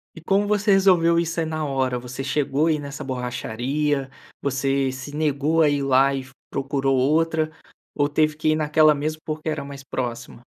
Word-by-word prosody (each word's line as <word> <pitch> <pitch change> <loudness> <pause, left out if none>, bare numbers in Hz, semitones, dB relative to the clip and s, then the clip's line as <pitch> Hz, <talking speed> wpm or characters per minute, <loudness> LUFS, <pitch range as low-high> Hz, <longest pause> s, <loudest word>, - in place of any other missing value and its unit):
E - - -9
como 195 +5 +1
você 205 0 +1
resolveu 175 -4 +4
isso 165 0 -1
aí 165 - 0
na 155 -1 -3
hora, 130 -2 0
você 125 +2 -7
chegou 140 +2 0
aí 155 -2 +1
nessa 140 -1 -7
borracharia, 130 +3 -2 0.3
você 135 0 0
se 135 +3 -8
negou 155 +1 +1
a 150 - +5
ir 145 -1 0
lá 135 +1 +4
e 130 -1 -4 0.2
procurou 135 -1 0
outra, 155 +3 +2 0.5
ou 145 0 +1
teve 155 0 +1
que 155 0 0
ir 155 - +3
naquela 155 0 +4
mesmo 155 +2 -3
porque 155 0 -5
era 155 -2 -2
mais 140 -1 -9
próxima? 120 -2 -5
145 Hz, 185 wpm, -23 LUFS, 135-155 Hz, 0.5 s, a